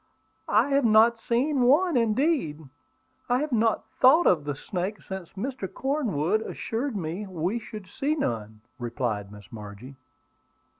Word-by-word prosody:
"I 220 Hz, +7 st, +3 dB
have 280 Hz, 0 st, +3 dB
not 225 Hz, +1 st, +5 dB
seen 260 Hz, +4 st, +1 dB
one; 300 Hz, +7 st, +4 dB
indeed, 230 Hz, -, +1 dB, 0.7 s
I 245 Hz, -, +3 dB
have 295 Hz, +2 st, -2 dB
not 225 Hz, -2 st, +1 dB
thought 290 Hz, +7 st, +6 dB
of 155 Hz, -5 st, +3 dB
the 145 Hz, -1 st, -2 dB
snakes 185 Hz, +7 st, -4 dB
since 190 Hz, -3 st, -7 dB
Mr. 230 Hz, -1 st, -4 dB
Cornwood 220 Hz, -, 0 dB
assured 230 Hz, +3 st, -3 dB
me 180 Hz, +4 st, -4 dB
we 185 Hz, +5 st, -2 dB
should 215 Hz, -3 st, -9 dB
see 290 Hz, +10 st, -1 dB
none," 110 Hz, -, -3 dB, 0.2 s
replied 115 Hz, -4 st, -3 dB
Miss 105 Hz, -3 st, -13 dB
Margie. 105 Hz, +4 st, -9 dB
215 Hz, 140 wpm, -26 LUFS, -, 0.7 s, thought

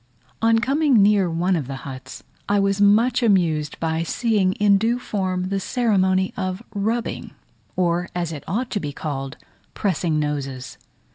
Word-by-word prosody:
On 225 Hz, 0 st, +4 dB
coming 270 Hz, -1 st, +3 dB
near 200 Hz, -3 st, +3 dB
one 175 Hz, +3 st, +1 dB
of 150 Hz, -7 st, -3 dB
the 135 Hz, -, -5 dB
huts 130 Hz, -1 st, -9 dB, 0.3 s
I 205 Hz, 0 st, +3 dB
was 195 Hz, 0 st, +1 dB
much 225 Hz, +5 st, +4 dB
amused 170 Hz, -9 st, +1 dB
by 160 Hz, 0 st, -1 dB
seeing 200 Hz, +1 st, +1 dB
in 200 Hz, -1 st, +3 dB
due 230 Hz, +3 st, +1 dB
form 185 Hz, -6 st, -2 dB
the 195 Hz, 0 st, -1 dB
ceremony 190 Hz, -4 st, +1 dB
of 185 Hz, +1 st, -3 dB
rubbing, 220 Hz, +3 st, -3 dB, 0.4 s
or, 175 Hz, -1 st, 0 dB
as 170 Hz, -2 st, -2 dB
it 150 Hz, -4 st, -7 dB
ought 230 Hz, +8 st, -2 dB
to 205 Hz, -, -1 dB
be 145 Hz, -5 st, -5 dB
called, 135 Hz, -1 st, -5 dB, 0.4 s
pressing 170 Hz, -5 st, 0 dB
noses. 140 Hz, -4 st, -4 dB
190 Hz, 155 wpm, -22 LUFS, 160-210 Hz, 0.4 s, On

